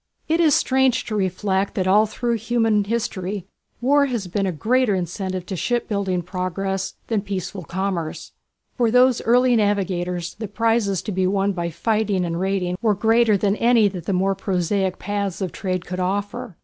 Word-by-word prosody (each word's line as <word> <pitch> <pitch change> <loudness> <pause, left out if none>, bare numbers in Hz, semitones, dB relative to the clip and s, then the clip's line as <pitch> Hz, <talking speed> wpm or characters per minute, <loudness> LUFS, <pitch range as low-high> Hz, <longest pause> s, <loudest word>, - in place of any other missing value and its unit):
It 325 +2 +1
is 315 -4 +5
strange 260 -1 +2
to 220 - -4
reflect 190 0 -1
that 185 - 0
all 210 +3 +4
through 235 +2 -1
human 225 -2 +1
history 200 -4 -3 0.4
war 280 +3 +4
has 235 -6 -2
been 195 +2 -1
a - - 0
greater 225 - +1
incentive 185 +1 -3
to 190 - -5
shipbuilding 200 -4 -1
progress 190 +1 -3
than 220 -3 0
peaceful 195 -1 -5
commerce. 175 -2 -3 0.4
For 240 -3 +2
those 250 +1 +4
early 245 +1 +4
navigators 180 -5 0
the 220 0 -6
prizes 220 -2 0
to - - -4
be 185 -1 +1
won 195 +1 +1
by 170 -3 -3
fighting 205 +1 0
and 170 0 -3
raiding 185 -1 -1
were 215 -3 +2
greater 225 +1 +3
than 200 +1 +1
any 235 -2 +4
that 180 -4 -8
the - - +1
more 190 +2 +2
prosaic 190 0 -1
paths 200 -2 -3
of 185 -4 -2
trade 185 -4 -3
could 180 +1 -5
offer. 195 -1 -3
200 Hz, 175 wpm, -22 LUFS, 185-225 Hz, 0.4 s, is